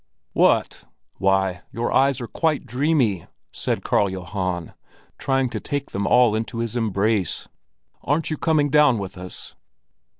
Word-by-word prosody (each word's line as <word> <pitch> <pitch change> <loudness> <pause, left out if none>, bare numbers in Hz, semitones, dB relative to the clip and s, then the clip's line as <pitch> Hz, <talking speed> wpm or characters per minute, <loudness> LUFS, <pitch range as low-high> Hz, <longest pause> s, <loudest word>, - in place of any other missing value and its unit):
"Why, 95 -2 0
your 115 +1 -2
eyes 135 -1 +3
are 120 - -4
quite 155 0 0
dreamy!" 125 - +1 0.2
said - - -2
Karl 100 - +2
Johan, 90 -2 -4 0.5
trying 135 -1 +1
to - - -4
take 145 -1 -4
them 100 0 -2
all 120 -1 +5
into 110 +1 -3
his 115 0 -3
embrace. 105 -4 0 0.6
"Aren't 155 +2 0
you 155 - -1
coming 150 -3 +2
down 150 -5 +5
with 100 -3 -5
us?" 90 0 -8
115 Hz, 135 wpm, -23 LUFS, 95-140 Hz, 0.6 s, all